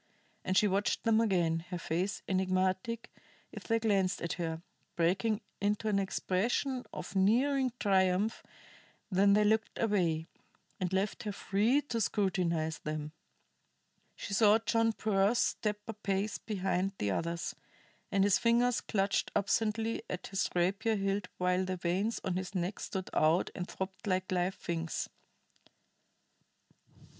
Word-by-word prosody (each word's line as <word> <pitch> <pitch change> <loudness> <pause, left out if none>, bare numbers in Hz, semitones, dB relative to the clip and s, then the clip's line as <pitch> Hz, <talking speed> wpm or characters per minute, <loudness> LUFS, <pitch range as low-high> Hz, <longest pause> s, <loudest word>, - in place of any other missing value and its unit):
And 185 - 0
she 210 - +5
watched 200 +1 0
them 225 -1 +4
again, 175 -7 +2
her 180 - -3
face 175 +4 -2
enigmatic 185 +4 0 0.4
if - - -9
they 230 - +2
glanced 195 -4 +1
at 170 - -1
her, 165 0 -3 0.3
breaking 190 +6 +1 0.2
into 210 +2 0
an 200 -1 +2
expression 230 +7 0
of - - -7
nearing 255 +7 +3
triumph 190 +1 +2 0.7
when 200 +1 +4
they 210 +1 +5
looked 220 +1 +1
away, 175 -8 +1 0.5
and 185 -1 -1
left 190 +2 -1
her 210 - -3
free 215 +8 +1
to 230 -5 -2
scrutinize 175 -7 0
them. 150 0 -4 1.0
She 200 - -6
saw 210 +1 +6
John 225 0 +2
Pearse 210 +1 +2
step 210 -2 0
a 225 - -3
pace 200 0 -2
behind 195 -2 -1
the 100 - -1
others, 170 - -2 0.6
and 195 -1 +3
his 200 -1 +4
fingers 240 +1 +3
clutched 195 -2 0
absently 225 +2 0
at 180 - -4
his 195 -1 -1
rapier 195 +6 +1
hilt 195 -1 -1
while 180 +1 +1
the 185 0 -3
veins 185 +6 0
on 185 -1 -1
his 185 +1 -5
neck 180 +2 -2
stood 190 -1 -5
out 160 +3 +3
and 180 -1 -5
throbbed 190 +2 -6
like 185 -1 0
live 180 +1 0
things. 165 -2 -3
195 Hz, 140 wpm, -32 LUFS, 185-215 Hz, 1.0 s, saw